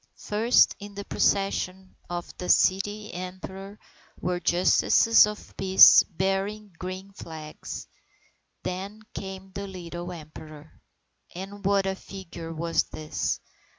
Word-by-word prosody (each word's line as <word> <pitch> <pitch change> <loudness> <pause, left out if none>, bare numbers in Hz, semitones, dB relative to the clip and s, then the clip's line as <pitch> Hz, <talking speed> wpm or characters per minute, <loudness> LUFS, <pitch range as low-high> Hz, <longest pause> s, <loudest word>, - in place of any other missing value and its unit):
First 220 +4 +3
in 205 -1 -10
the 200 0 -6
procession 190 -1 0
of 175 0 -5
the 180 - -4
Child 205 +3 +2
Emperor, 190 +2 -7 0.4
were 180 0 -1
justices 185 +6 +5
of 210 0 -7
the - - -22
peace 190 0 +8
bearing 195 +3 -2
green 185 +2 -6
flags. 155 -4 -8 0.8
Then 195 +4 -5
came 190 -1 -7
the 200 +1 -5
little 175 -1 -7
Emperor. 155 -2 -11 0.5
And 195 +2 -8
what 200 0 +2
a 190 - 0
figure 180 -4 -9
was 165 +1 +1
this! 155 0 -3
190 Hz, 120 wpm, -26 LUFS, 175-200 Hz, 0.8 s, peace